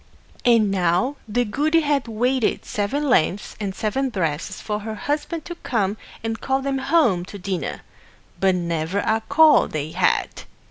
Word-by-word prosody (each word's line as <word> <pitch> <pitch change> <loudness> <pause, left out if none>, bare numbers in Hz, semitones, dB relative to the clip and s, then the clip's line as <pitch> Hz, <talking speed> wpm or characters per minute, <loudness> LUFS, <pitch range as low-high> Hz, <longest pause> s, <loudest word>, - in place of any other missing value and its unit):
And 230 -4 +4
now 185 +9 +1
the 245 +3 +1
goody 305 +9 +2
had 285 -4 0
waited 245 +2 0
seven 275 +9 -1
lengths 205 - +1
and 195 -3 -3
seven 260 +7 -1
breadths 165 -8 -2
for 210 -1 -3
her 215 +1 -5
Husband 300 +6 -3
to 345 - -5
come 215 - -1 0.3
and 225 0 -3
call 265 0 +1
them 270 -1 -1
home 265 - +2
to 200 - -9
dinner; 190 -1 -4 0.6
but 190 -1 +3
never 170 +1 -2
a 220 0 +1
call 310 +1 +6
they 155 0 -4
had. - - 0
220 Hz, 155 wpm, -22 LUFS, 190-275 Hz, 0.6 s, call